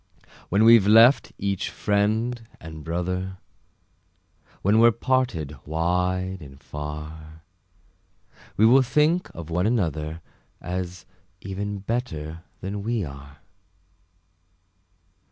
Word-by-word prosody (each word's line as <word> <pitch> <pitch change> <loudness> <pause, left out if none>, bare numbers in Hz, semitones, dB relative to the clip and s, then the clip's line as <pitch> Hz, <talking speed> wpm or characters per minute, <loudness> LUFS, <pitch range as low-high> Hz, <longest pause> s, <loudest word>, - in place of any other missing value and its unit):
When 100 +4 +3
we've 115 -3 +7
left 115 +5 +6
each 100 -1 -2
friend 110 +4 0 0.2
and 80 -1 -9
brother, 90 +3 -3 1.3
When 105 +3 +4
we're 115 +1 +8
parted 115 - -1
wide 90 +4 -1
and 70 -2 -12
far, 75 +1 -8 1.1
We 110 - +5
will 130 +4 +7
think 150 +7 +2
of 85 -1 -8
one 90 +4 +1
another, 80 - -1 0.4
As 90 0 -5 0.4
even 100 +1 -4
better 85 -8 -4 0.2
than 100 +2 -4
we 115 0 -1
are. 70 +1 -11
95 Hz, 100 wpm, -24 LUFS, 80-110 Hz, 1.3 s, we're